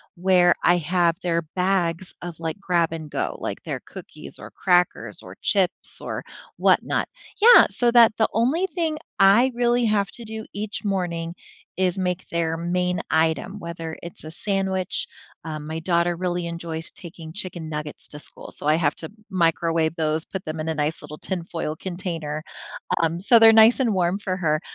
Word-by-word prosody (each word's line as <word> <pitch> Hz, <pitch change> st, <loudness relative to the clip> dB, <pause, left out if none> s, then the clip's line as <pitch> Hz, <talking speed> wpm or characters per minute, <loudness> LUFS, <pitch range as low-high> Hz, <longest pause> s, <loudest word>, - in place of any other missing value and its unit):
where 180 Hz, -1 st, +4 dB
I 175 Hz, -, +5 dB
have 170 Hz, 0 st, +1 dB
their 170 Hz, -1 st, 0 dB, 0.2 s
bags 180 Hz, -1 st, 0 dB
of, 175 Hz, -2 st, -7 dB
like, 165 Hz, +3 st, -3 dB
grab 175 Hz, -4 st, +1 dB
and 160 Hz, -2 st, -6 dB
go, 140 Hz, -, -2 dB
like -, -, -4 dB
their -, -, -4 dB
cookies, -, -, -10 dB
or -, -, -9 dB
crackers, 175 Hz, -, +1 dB
or 90 Hz, +1 st, -11 dB
chips, 190 Hz, -3 st, 0 dB
or -, -, -4 dB, 0.3 s
whatnot. -, -, +2 dB, 0.3 s
Yeah, 480 Hz, +2 st, +9 dB
so 240 Hz, -1 st, +1 dB
that 235 Hz, -2 st, +7 dB
the 220 Hz, -, +2 dB
only 265 Hz, +11 st, +2 dB
thing 325 Hz, -3 st, -2 dB, 0.2 s
I 215 Hz, +7 st, +6 dB
really 240 Hz, 0 st, +2 dB
have 205 Hz, -2 st, +1 dB
to 235 Hz, -, -7 dB
do 220 Hz, 0 st, -6 dB
each 215 Hz, +1 st, -4 dB
morning 175 Hz, -3 st, -2 dB, 0.4 s
is 185 Hz, 0 st, +1 dB
make 180 Hz, 0 st, -1 dB
their 165 Hz, -1 st, 0 dB
main 180 Hz, +1 st, -1 dB
item, 160 Hz, +5 st, +1 dB
whether 170 Hz, -2 st, -6 dB
it's 170 Hz, -1 st, -9 dB
a 155 Hz, -, -7 dB
sandwich, 190 Hz, 0 st, -1 dB, 0.4 s
um 155 Hz, -2 st, -6 dB
my 160 Hz, +1 st, -4 dB
daughter 170 Hz, 0 st, +1 dB
really 175 Hz, -1 st, -2 dB
enjoys 170 Hz, -1 st, -5 dB
taking 165 Hz, -2 st, -10 dB
chicken 175 Hz, -4 st, -6 dB
nuggets 150 Hz, -1 st, -5 dB
to 150 Hz, -, -7 dB
school, -, -, -11 dB
so -, -, -8 dB
I 155 Hz, -, +5 dB
have 155 Hz, -3 st, +1 dB
to 160 Hz, -, -7 dB, 0.2 s
microwave 165 Hz, -3 st, +1 dB
those, 155 Hz, 0 st, 0 dB
put 190 Hz, -1 st, -6 dB
them 155 Hz, 0 st, -4 dB
in 160 Hz, -, -3 dB
a -, -, 0 dB
nice 150 Hz, +1 st, -1 dB
little 150 Hz, 0 st, -9 dB
tinfoil 170 Hz, -4 st, -4 dB
container, 165 Hz, -5 st, -4 dB, 0.6 s
um, 165 Hz, +1 st, 0 dB
so 230 Hz, +4 st, +6 dB
they're 225 Hz, 0 st, +8 dB
nice 225 Hz, +4 st, +7 dB
and 235 Hz, -5 st, +2 dB
warm 185 Hz, +1 st, +1 dB
for 185 Hz, -2 st, -2 dB
her, 155 Hz, -4 st, +1 dB
175 Hz, 175 wpm, -23 LUFS, 160-195 Hz, 0.6 s, Yeah